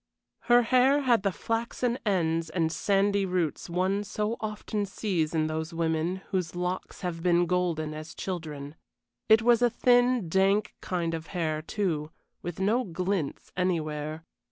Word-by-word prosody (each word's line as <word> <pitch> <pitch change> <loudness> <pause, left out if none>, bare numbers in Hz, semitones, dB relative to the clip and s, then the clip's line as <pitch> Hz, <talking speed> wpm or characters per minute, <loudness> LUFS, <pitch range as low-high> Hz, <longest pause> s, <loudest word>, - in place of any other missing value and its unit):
Her 240 0 +7
hair 260 +4 +4
had 245 -6 +3
the 195 0 +1
flaxen 235 +4 -2
ends 165 -4 +1
and 165 -3 0
sandy 200 +2 +2
roots 180 -3 -1
one 185 +4 0
so 210 +2 -2
often 210 -1 -3
sees 175 -6 -1
in 155 -1 +2
those 160 +2 -3
women 165 +3 -1
whose 180 -4 -2
locks 180 +1 -3
have 175 -3 -3
been 175 0 +3
golden 170 -4 0
as 155 +1 -8
children. 150 -6 -5 0.6
It 220 +1 +6
was 240 0 +5
a 245 - +5
thin, 245 -3 +3
dank 195 +4 +2
kind 170 -2 -2
of 160 0 -5
hair, 155 -4 -2
too, 160 -4 -2 0.3
with 175 0 -6
no 220 +6 +2
glints 180 - -3
anywhere. 155 -3 -2
180 Hz, 150 wpm, -28 LUFS, 160-210 Hz, 0.6 s, Her